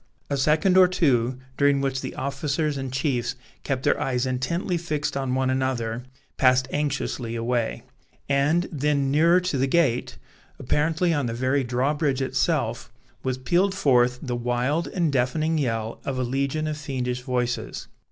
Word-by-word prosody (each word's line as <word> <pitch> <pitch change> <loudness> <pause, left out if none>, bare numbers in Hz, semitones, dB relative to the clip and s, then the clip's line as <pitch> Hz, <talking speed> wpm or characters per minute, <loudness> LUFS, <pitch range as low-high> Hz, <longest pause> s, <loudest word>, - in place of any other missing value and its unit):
A 140 - +1
second 155 +7 +3
or 185 -1 +8
two, 130 -9 +1 0.2
during 140 -1 +3
which 135 -1 -1
the - - -6
officers 145 +2 -1
and 135 -2 -4
chiefs 130 -3 -1 0.3
kept 130 -2 -2
their - - +2
eyes 125 -1 0
intently 130 +9 -1
fixed 155 -5 -2
on 135 -2 -1
one 130 0 +1
another, 125 -3 -1 0.4
passed 130 -1 +4
anxiously 135 -5 -2
away; 115 0 -1 0.4
and 145 +5 +2
then 140 -2 0
nearer 165 +5 +5
to 180 -7 -1
the 135 - +2
gate, 135 -5 +1 0.4
apparently 160 +6 +1
on 145 -5 0
the 115 - -3
very 130 +3 +1
drawbridge 135 +3 0
itself, 130 - -1 0.3
was 130 -1 -2
pealed 180 +9 +1
forth 125 -8 +3
the 125 -3 -2
wild 125 +7 0
and 170 -5 0
deafening 155 +5 +1
yell 115 -4 -2
of 135 -2 -3
a 130 - 0
legion 140 +5 -1
of 155 -1 -2
fiendish 125 -4 -3
voices. 125 -1 -2
135 Hz, 155 wpm, -25 LUFS, 125-150 Hz, 0.4 s, or